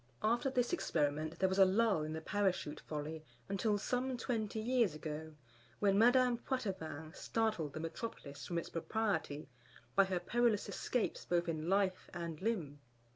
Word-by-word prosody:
After 235 +5 +2
this 250 +3 +1
experiment 155 - 0
there 190 - +3
was 190 +1 0
a - - +10
lull 200 -2 +3
in 155 +1 -3
the 160 - -4
Parachute 185 -5 0
folly 155 +1 -5 0.2
until 205 +2 +1
some 250 +4 -1
twenty 225 -3 -2
years 230 -6 +2
ago, 155 0 -6 0.4
when 200 -1 +3
Madame 245 +2 +5
Poitevin 185 - -3
startled 215 -10 -1
the 155 - -4
Metropolis 160 -4 -6
from 170 - -2
its 170 - -2
propriety 170 -5 -1 0.5
by 195 - +6
her 185 -2 -1
perilous 230 +3 +2
escapes 245 -3 -1
both 175 0 +1
in 160 0 -2
life 195 -1 +1
and 170 -2 -4
limb. 175 -10 -1
190 Hz, 155 wpm, -36 LUFS, 160-225 Hz, 0.5 s, a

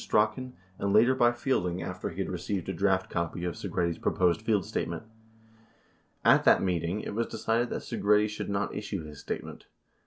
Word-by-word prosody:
182 125 +4 +2 0.3
later 110 +6 +5
by 120 -2 +4
Fielding 120 -8 -1
after 90 +2 -4
he 85 - -11
had - - -2
received 90 +1 -3
a 95 - -2
draft 95 +1 +1
copy 85 0 -3
of 90 - -1
Segretti's 85 +2 -2
proposed 90 +3 +1
press 105 -5 +1
statement. 85 +3 -3 1.2
At - - +6
that - - +6
meeting 90 +2 0
it - - -5
was 115 +2 0
decided 120 +2 0
that - - -4
Segretti 105 +1 +2
should 105 - -5
not 100 0 -1
issue 100 -4 -4
his 75 -2 -10
statement. - - -6
100 Hz, 175 wpm, -29 LUFS, 90-110 Hz, 1.2 s, At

